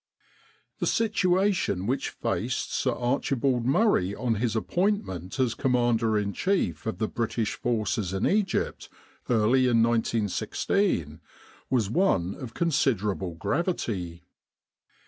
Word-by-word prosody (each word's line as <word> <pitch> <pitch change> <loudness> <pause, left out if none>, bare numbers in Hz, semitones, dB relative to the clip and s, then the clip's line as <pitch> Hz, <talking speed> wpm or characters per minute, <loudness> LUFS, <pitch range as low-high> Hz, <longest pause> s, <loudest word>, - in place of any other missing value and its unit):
The - - 0
situation 190 - +1
which 130 +5 -1
faced 120 +9 -2
Sir 130 - +1
Archibald 125 0 0
Murray 135 - +2
on 120 0 0
his 115 +1 -1
appointment 125 - -1
as 125 -3 +2
Commander 120 -4 +1
in 100 -1 -1
Chief 195 - -1
of 110 - -2
the 110 - -1
British 115 -1 -2
Forces 110 -4 -1
in 95 +1 -1
Egypt 200 -3 0 0.4
early 120 +3 +3
in 115 -2 +4
1916, 110 - 0 0.5
was 115 -6 +1
one 100 - +2
of 120 -4 -9
considerable 105 - 0
gravity. 90 - -2
115 Hz, 110 wpm, -27 LUFS, 105-140 Hz, 0.5 s, in